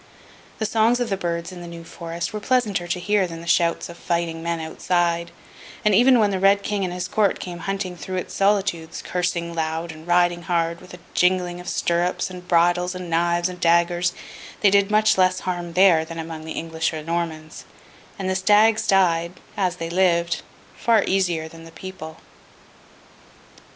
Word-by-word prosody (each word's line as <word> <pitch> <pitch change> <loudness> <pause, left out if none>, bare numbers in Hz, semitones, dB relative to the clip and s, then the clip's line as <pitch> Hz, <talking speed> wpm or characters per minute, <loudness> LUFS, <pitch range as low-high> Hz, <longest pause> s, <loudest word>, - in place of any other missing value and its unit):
The 220 - -2
songs 225 +3 +2
of 240 -3 -2
the - - +2
birds 170 -1 -3
in 180 -1 -9
the 175 - -8
New 170 0 -9
Forest 170 +3 -6
were 210 - -3
pleasanter 210 -7 0
to 175 +1 -2
hear 205 0 +1
than 165 -1 -8
the - - -10
shouts 170 0 +1
of 170 0 -11
fighting 170 -1 -2
men 170 0 -2
outside; 170 +1 -1 0.6
and 210 - +4
even 245 +5 +6
when 210 -3 +3
the 190 - -1
Red 200 +1 +4
King 205 -1 -1
and 180 - -2
his 180 +1 -4
Court 205 0 +1
came 175 -1 -6
hunting 195 -2 -3
through 185 +2 -6
its 180 - -4
solitudes, 195 -5 0
cursing 175 -1 -2
loud 160 0 -2
and 160 +1 -13
riding 175 0 +3
hard, 170 -1 -1
with 180 -1 -11
a - - -15
jingling 180 -1 +1
of 180 - -7
stirrups 175 +2 0
and 180 -1 -10
bridles 175 +1 +2
and 180 -2 -7
knives 170 +1 +2
and 180 -1 -8
daggers, 175 0 +2 0.5
they 205 - +5
did 200 0 +4
much 215 -1 +3
less 185 0 +3
harm 175 -2 -4
there 180 -3 +5
than 165 +1 -8
among 160 -1 -6
the 160 - -5
English 160 0 -2
or 155 -1 -5
Normans, 160 -1 -4 0.5
and 195 - -3
the 190 - +1
stags 215 +3 +3
died 170 -3 +2 0.2
(as 185 -3 0
they 165 -2 -5
lived) 170 -2 +2 0.3
far 225 -3 +3
easier 175 -4 0
than 165 0 -13
the 165 - -12
people. 165 -4 -9
175 Hz, 185 wpm, -23 LUFS, 170-190 Hz, 0.6 s, even